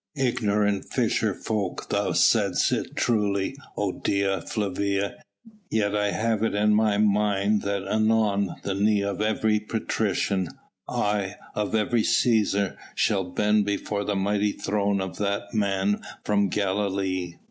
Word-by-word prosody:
"Ignorant 105 -6 +1
fisher - - +1
folk 105 -4 -3
thou - - +1
saidst - - +3
it - - -2
truly, 105 -1 0 0.2
O 100 -2 0
Dea 100 0 0
Flavia, 100 0 -2 0.5
yet 105 -2 0
I 105 0 +1
have 110 +1 0
it 115 - 0
in 105 +1 +3
my 105 -1 +3
mind 105 0 +2
that 100 -1 -2
anon 105 -2 +1
the 100 - -1
knee 100 +1 +2
of 100 0 -2
every 110 0 +1
patrician 105 -4 -1 0.4
aye! 105 -2 -1 0.2
of 105 +1 -1
every 110 +2 +2
Cæsar 105 -4 +2 0.2
shall 95 -3 +1
bend 105 +3 +1
before 100 0 -2
the 105 0 -1
mighty 100 +1 +1
throne 100 -1 0
of 95 -1 -5
that 100 0 -2
Man 100 -1 +1 0.2
from 100 -1 +2
Galilee." 95 -2 -1
100 Hz, 135 wpm, -25 LUFS, 100-105 Hz, 0.5 s, saidst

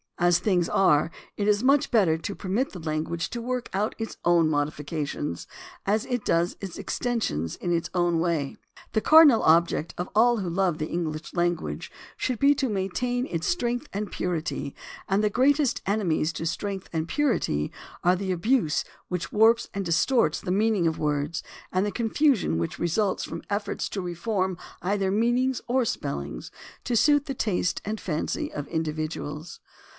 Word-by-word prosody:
As 175 -1 +4
things 180 -5 +2
are, 155 -5 +4 0.3
it 205 - -1
is 210 +2 +3
much 275 +2 +4
better 195 -9 +4
to 195 +5 -5
permit 205 +8 -1
the 180 - -8
language 160 +1 -2
to 235 - -4
work 250 +1 -3
out 205 +3 0
its 225 - -5
own 170 -2 +4
modifications 150 - -2 0.4
as 210 +2 +1
it 245 -4 -2
does 170 +2 +1
its 195 -4 -6
exten 245 -2 -2
sions 80 - -2
in 175 - -3
its 165 - -2
own 175 -2 +2
way. 165 -5 -1 0.4
The 220 - +2
cardinal 310 -6 +7
object 165 0 +3
of 175 - -3
all 240 +2 +5
who 190 -4 -2
love 180 -2 +1
the 155 - -2
English 160 -2 -3
language 175 -1 -1 0.3
should 255 -2 -1
be 280 +1 +6
to 270 -2 0
maintain 245 +6 -1
its 165 -1 -3
strength 245 -9 -1
and 205 -1 -3
purity, 155 -5 -3 0.3
and 195 +2 +2
the 210 - +3
greatest 275 +4 +2
enemies 180 -6 +1
to 165 - -4
strength 195 +2 -3
and 160 0 -1
purity 230 - 0 0.3
are 180 +1 +4
the 190 0 -2
abuse 185 - +1 0.2
which 170 -3 -3
warps 225 +2 +4
and 200 - -2
distorts 170 - +2
the 180 - -3
meaning 205 -2 +2
of 160 - -1
words 150 +2 -1 0.3
and 185 +1 +1
the 205 - -1
confusion 235 - +2
which 85 - -3
results 185 +4 0
from 165 - -6
efforts 205 0 -2
to 195 - -3
reform 185 +1 -2 0.3
either 195 0 +1
meanings 240 +4 +1
or 255 +1 +2
spelling 70 - -3 0.4
to 245 - -1
suit 290 +5 +4
the 275 -3 -4
taste 190 -6 0
and 215 +1 -3
fancy 155 -4 -2
of 145 -1 -5
individuals. 155 -1 -4
185 Hz, 170 wpm, -26 LUFS, 165-225 Hz, 0.4 s, cardinal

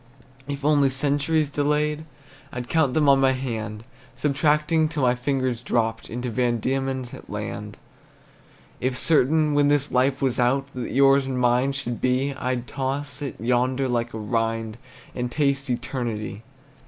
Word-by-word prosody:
If 140 0 -5
only 145 -2 +4
centuries 145 +3 +1
delayed, 150 +1 0 0.5
I'd 125 0 -5
count 155 -4 +1
them 155 -2 +3
on 140 -1 +6
my 135 0 +4
hand, 110 -5 -4 0.3
Subtracting 150 +2 +2
till 150 -3 -2
my 125 -1 +4
fingers 130 -1 -1
dropped 115 -2 -1
Into 120 +1 -4
Van 120 0 +1
Diemen's 130 +1 -2
land. - - -6 1.0
If 125 0 -1
certain, 155 +1 +3
when 145 0 +4
this 145 0 +1
life 130 +2 +2
was 130 -2 0
out, 130 +3 +2
That 125 -2 -4
yours 135 0 +4
and 130 -1 -2
mine 125 +2 +2
should 120 -4 -4
be, 130 +2 +1
I'd 125 -3 -2
toss 135 +1 -4
it 140 -3 -5
yonder 125 +3 +1
like 120 -1 -1
a - - -6
rind, 115 0 -2 0.3
And 125 -1 -3
taste 140 -1 0
eternity. 120 -4 -3
130 Hz, 150 wpm, -24 LUFS, 120-145 Hz, 1.0 s, on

